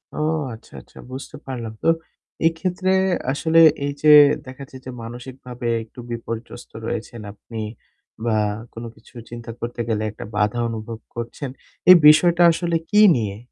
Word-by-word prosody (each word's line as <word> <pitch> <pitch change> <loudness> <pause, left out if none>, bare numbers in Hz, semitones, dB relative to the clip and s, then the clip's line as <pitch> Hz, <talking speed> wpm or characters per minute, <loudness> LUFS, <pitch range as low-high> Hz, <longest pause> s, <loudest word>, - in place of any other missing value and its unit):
ও - - -7 0.4
আচ্ছা, 110 - -14
আচ্ছা - - -22
বুঝতে 135 +3 -8
পারলাম। 120 -4 -5
তো - - 0 0.6
এক্ষেত্রে 180 +3 -1 0.4
আসলে 160 +3 +2 0.3
এই 145 - -1
যে 155 - +4 0.4
দেখাচ্ছে 130 0 -10
যে - - -6
মানসিকভাবে 125 +1 -8 0.2
একটু 115 +3 -16
বিপর্যস্ত 115 0 -7
রয়েছেন 115 0 -5
আপনি 110 +2 -10 0.7
বা 115 -2 +1 0.4
কোনো 115 +1 -7
কিছু - - -21 0.2
চিন্তা 120 0 -8
করতে 120 0 -4
গেলে 110 -1 0
একটা 105 - -9
বাধা 105 +3 +1
অনুভব 110 0 -6 0.2
করছেন। 120 +4 -5 0.4
এই 185 - +12
বিষয়টা 170 +3 +6
আসলে 170 0 -1
কী 210 0 +5
নিয়ে? 105 -4 -3
120 Hz, 140 wpm, -21 LUFS, 115-150 Hz, 0.7 s, এই